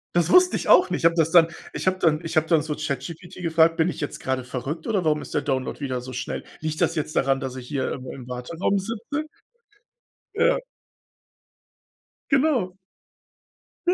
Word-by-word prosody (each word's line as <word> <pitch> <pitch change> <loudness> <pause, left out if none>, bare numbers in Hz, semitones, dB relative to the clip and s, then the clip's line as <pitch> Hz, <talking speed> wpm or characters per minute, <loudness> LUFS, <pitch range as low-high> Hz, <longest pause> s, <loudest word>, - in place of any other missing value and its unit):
Das 175 -1 +3
wusste 365 0 +6
ich - - -3
auch 365 - +7
nicht. 175 -2 -1
Habe 165 - +5
das 165 -1 +2
dann 165 -1 +7 0.3
ich - - -4
habe 185 - +3
dann 160 -2 +2
ich 165 0 -3
habe 155 - +3
dann 160 -2 +4
so 150 0 -3
ChatGPT 155 +5 -5
gefragt: 165 -1 +3
„Bin 165 +2 +3
ich - - -6
jetzt 145 - -4
gerade 130 -1 -2
verrückt 135 +6 -5
oder 200 -5 +1
warum 150 -1 +2
ist - - -9
der - - +1
Download 130 -2 -2
wieder 130 -3 -3
so 130 +1 -8
schnell? 125 - -4 0.2
Liegt 155 0 -3
das 165 - +2
jetzt 155 -1 -3
daran, 135 0 +2
dass 130 -1 -5
ich 125 -1 -8
hier 135 -2 -2
im 130 -1 -8
im 125 -2 -10
Warteraum 145 +11 -1
sitze?“ 230 +9 -4 1.1
Ja. - - +3 1.7
Genau. 265 -10 +2 1.1
Ja, 360 - +5
160 Hz, 190 wpm, -24 LUFS, 135-180 Hz, 1.7 s, auch